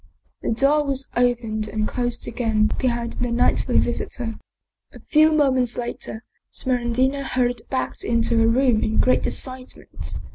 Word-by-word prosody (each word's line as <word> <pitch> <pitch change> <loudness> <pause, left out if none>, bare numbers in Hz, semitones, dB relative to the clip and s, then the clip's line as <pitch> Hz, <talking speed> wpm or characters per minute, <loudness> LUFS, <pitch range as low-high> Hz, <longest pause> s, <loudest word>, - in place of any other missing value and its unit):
The - - -2
door 275 +6 +3
was 275 -1 -1
opened 235 -3 0
and 215 0 -2
closed 245 -1 -2
again 220 -2 +1
be 260 - +1
hind 235 -1 -2
the 245 -1 -3
nightly 235 - +2
visitor. 230 -3 -2 0.5
A - - -13
few 310 +1 +4
moments 260 -5 +2
later, 235 -1 -5 0.3
Smeraldina 255 +2 0
hurried 245 -2 0
back 260 -1 -3
into 230 0 +1
her 225 - +4
room 240 -1 +3
in 220 - -1
great 255 - +3
excitement. 255 -1 -4
245 Hz, 145 wpm, -22 LUFS, 230-260 Hz, 0.5 s, few